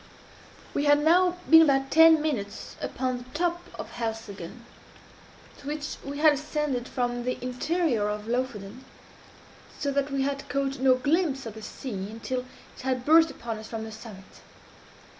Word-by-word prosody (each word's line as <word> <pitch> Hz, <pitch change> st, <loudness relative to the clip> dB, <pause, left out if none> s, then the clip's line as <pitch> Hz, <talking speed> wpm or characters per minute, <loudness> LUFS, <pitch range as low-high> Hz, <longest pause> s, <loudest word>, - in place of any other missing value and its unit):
We 285 Hz, -, 0 dB
had 290 Hz, 0 st, +5 dB
now 355 Hz, +3 st, +4 dB
been 320 Hz, 0 st, +9 dB
about 270 Hz, -3 st, +3 dB
ten 320 Hz, -1 st, +7 dB
minutes 215 Hz, -10 st, -3 dB
upon 255 Hz, 0 st, -2 dB
the -, -, -10 dB
top 345 Hz, +1 st, 0 dB
of -, -, -7 dB
Helseggen, 225 Hz, -2 st, -6 dB, 0.9 s
to 280 Hz, -, -12 dB
which 300 Hz, 0 st, -4 dB
we 280 Hz, +1 st, -6 dB
had 305 Hz, 0 st, +6 dB
ascended 290 Hz, -3 st, -2 dB
from 245 Hz, -1 st, -2 dB
the 250 Hz, +1 st, -2 dB
interior 250 Hz, -2 st, 0 dB
of 210 Hz, 0 st, -4 dB
Lofoden, 240 Hz, -2 st, -3 dB, 0.9 s
so 285 Hz, -2 st, -1 dB
that 280 Hz, 0 st, 0 dB
we 275 Hz, -1 st, 0 dB
had 275 Hz, 0 st, -3 dB
caught 275 Hz, -1 st, -1 dB
no 260 Hz, -1 st, +5 dB
glimpse 280 Hz, 0 st, 0 dB
of 225 Hz, -, -6 dB
the 220 Hz, -, -10 dB
sea 205 Hz, -4 st, -6 dB
until 250 Hz, +3 st, -4 dB, 0.3 s
it -, -, -11 dB
had 255 Hz, -1 st, -2 dB
burst 325 Hz, +1 st, +6 dB
upon 230 Hz, -2 st, -6 dB
us 220 Hz, -, -9 dB
from 225 Hz, -1 st, -5 dB
the 220 Hz, -, -7 dB
summit. 215 Hz, -3 st, -12 dB
265 Hz, 160 wpm, -27 LUFS, 230-295 Hz, 0.9 s, been